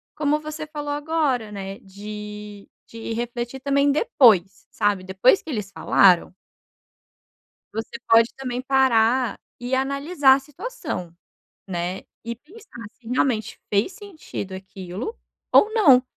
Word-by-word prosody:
como 300 0 +1
você 305 0 -6
falou 295 -1 -5
agora, 290 -7 0
né, 195 0 -6
de 210 +1 -9 0.2
de 230 0 -6
refletir 240 +2 -4
também 280 +1 +2
depois, 205 - +3
sabe, 205 -3 0
depois 190 - +3
que 320 - -11
eles 210 -7 -4
falaram. 185 -1 +4 1.4
Você 225 +2 -5
pode 230 +1 +6
também 250 -2 -4
parar 255 -3 +3 0.2
e 245 +2 -1
analisar 275 +1 +3
a - - +1
situação, 280 - -6 0.5
né, 175 +1 -3 0.2
e 235 0 -3
pensar 295 - -13
se 235 - -24
realmente 245 -3 0
fez 205 - +1
sentido 365 - -8
aquilo 190 - -7 0.4
ou 425 - +6
não. 285 - +6
245 Hz, 125 wpm, -23 LUFS, 205-285 Hz, 1.4 s, pode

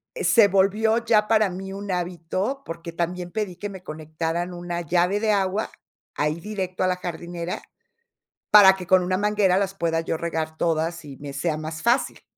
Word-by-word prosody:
se 235 - +5
volvió 215 +4 +2
ya 215 -2 +3
para 215 -2 +4
mí 190 +1 -6
un 200 0 -5
hábito, 180 - -2
porque 165 +1 -7
también 175 +1 -3
pedí 210 -4 -3
que 205 +4 -5
me 190 -2 -10
conectaran 160 +2 -4
una 175 0 -4
llave 180 +4 +1
de 220 -1 +2
agua, 200 +1 0 0.5
ahí 150 +3 -1
directo 190 -3 -3
a - - +3
la 180 0 0
jardinera, 175 0 -5 0.9
para 200 -2 +9
que 185 -1 -8
con 185 0 +5
una 185 +1 0
manguera 205 -2 +2
las 195 -1 0
pueda 165 -3 0
yo 165 - -2
regar 160 -1 -3
todas 165 0 -1
y 140 -2 -10
me 140 -1 -8
sea 155 +3 -1
más 155 +1 -6
fácil. 240 +3 +1
180 Hz, 180 wpm, -24 LUFS, 165-200 Hz, 0.9 s, para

